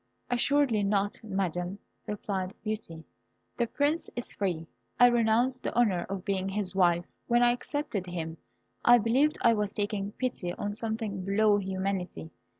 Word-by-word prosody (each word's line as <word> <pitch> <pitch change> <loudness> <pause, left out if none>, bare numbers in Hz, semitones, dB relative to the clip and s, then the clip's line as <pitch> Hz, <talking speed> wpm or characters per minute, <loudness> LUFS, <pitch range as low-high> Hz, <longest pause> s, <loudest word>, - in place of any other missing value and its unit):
"Assuredly 255 -2 +3
not, 200 +1 0
Madam," 190 -2 -2 0.3
replied 195 -1 -3
Beauty. 210 -7 -4 0.5
"The 235 - +1
Prince 290 +7 0
is 240 - -5
free. 175 -5 -2 0.3
I 245 - +9
renounce 240 +2 +2
the - - -4
honour 205 -8 +2
of 195 -2 -4
being 195 -2 -1
his 195 -1 -2
wife. 175 -2 +3 0.2
When 240 0 +4
I 240 - +6
accepted 245 -6 -3
him, 165 -2 -4 0.5
I 240 0 +8
believed 255 +7 +2
I 230 - +6
was 210 -2 -1
taking 205 -1 -2
pity 220 -9 -3
on 205 +2 -3
something 220 -3 -3
below 205 +2 +3
humanity. 190 - -3
205 Hz, 150 wpm, -29 LUFS, 190-235 Hz, 0.5 s, I